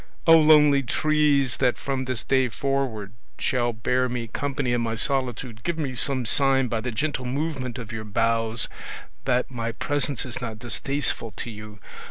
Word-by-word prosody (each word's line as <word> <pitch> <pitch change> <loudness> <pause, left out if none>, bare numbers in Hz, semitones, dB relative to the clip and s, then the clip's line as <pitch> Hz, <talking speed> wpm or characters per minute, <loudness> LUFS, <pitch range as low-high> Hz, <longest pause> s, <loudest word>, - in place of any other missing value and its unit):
Oh, 165 -1 +8
lonely 150 -2 +6
trees, 145 -1 +2
that 125 -2 +1
from 135 -1 -3
this 130 -3 -3
day 130 -1 +2
forward 125 -6 -2 0.2
shall 120 -3 0
bear 125 +3 0
me 120 -1 -3
company 135 +1 -2
in 120 - +1
my 115 -1 -2
solitude, 125 -3 -2
give 170 +6 -2
me 140 -5 -2
some 130 +1 +3
sign 135 +1 +3
by 115 -1 -1
the 125 - -3
gentle 130 +2 -2
movement 135 -1 -3
of 115 -4 -7
your 110 -1 -5
boughs 115 +1 0 0.6
that 125 0 +1
my 115 -2 -3
presence 145 +2 -1
is 130 +1 -5
not 115 -3 -5
distasteful 120 +1 -2
to 120 - -4
you! 105 -1 -10
125 Hz, 170 wpm, -24 LUFS, 115-140 Hz, 0.6 s, Oh